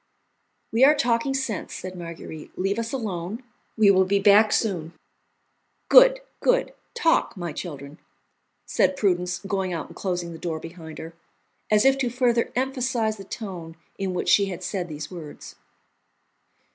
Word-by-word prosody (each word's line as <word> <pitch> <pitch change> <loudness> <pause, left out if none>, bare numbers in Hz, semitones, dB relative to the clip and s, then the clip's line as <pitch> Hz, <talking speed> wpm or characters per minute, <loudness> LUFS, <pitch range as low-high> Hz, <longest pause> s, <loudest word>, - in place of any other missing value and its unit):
"We 230 +3 +3
are 295 +3 +7
talking 240 +1 +1
sense," 250 -8 -3
said 185 0 -6
Marguerite; 165 -2 -9
"leave 195 +4 0
us 230 0 -3
alone; 215 -2 -4 0.3
we 210 -2 +6
will 190 -1 +5
be 195 +2 +1
back 205 +2 +5
soon." 175 -7 -1 1.0
"Good, - - +7 0.2
good! - - +2 0.2
Talk, 330 - +2
my 170 -3 -4
children," 145 -2 -8 0.7
said 280 - +1
Prudence, 180 -5 +1
going 190 -2 -1
out 165 - -3
and - - -13
closing 175 -3 -3
the 165 - -9
door 165 -2 -3
behind 165 -1 -10
her, 165 +1 -8 0.6
as 210 +2 +4
if 270 0 +4
to 250 -2 0
further 240 -1 +1
emphasize 250 -4 0
the 195 - -9
tone 180 -5 -7 0.2
in 190 -2 -2
which - - -1
she 200 - +5
had 185 -1 -6
said 180 -1 -3
these 150 +1 -7
words. 165 -5 -9
195 Hz, 155 wpm, -24 LUFS, 175-235 Hz, 1.0 s, are